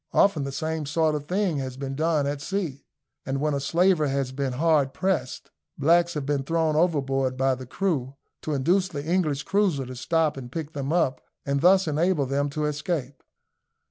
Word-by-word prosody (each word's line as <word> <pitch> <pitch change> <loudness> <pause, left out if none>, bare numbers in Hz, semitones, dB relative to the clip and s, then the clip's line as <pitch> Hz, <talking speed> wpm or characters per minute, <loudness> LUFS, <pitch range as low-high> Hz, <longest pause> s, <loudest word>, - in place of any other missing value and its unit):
Often 160 -8 +3
the 140 - -4
same 155 +1 -3
sort 155 +1 +1
of 145 -1 -4
thing 185 -4 0
has 130 -2 -4
been 135 0 -4
done 155 0 +1
at 140 0 -3
sea, 170 -6 -3 0.4
and 135 0 -2
when 150 +1 0
a 140 - 0
slaver 170 +2 +2
has 135 -1 -1
been 135 -1 -2
hard 145 -1 +2
pressed, 185 -9 -2 0.3
blacks 170 +4 +3
have 145 -2 -3
been 145 -1 0
thrown 160 +2 0
overboard 135 -6 +1
by 135 0 +2
the 130 0 -7
crew, 140 -6 -2 0.3
to 155 - -2
induce 180 +8 +2
the 145 -5 -6
English 155 -4 0
cruiser 190 -9 +1
to 130 +1 -8
stop 160 +3 0
and 125 -2 -8
pick 160 +1 -5
them 140 0 -3
up, 150 -7 +1 0.2
and 140 0 0
thus 185 +1 +5
enable 155 0 +1
them 140 +2 0
to 150 +2 -2
escape. 150 -3 -3
150 Hz, 190 wpm, -25 LUFS, 135-165 Hz, 0.4 s, thus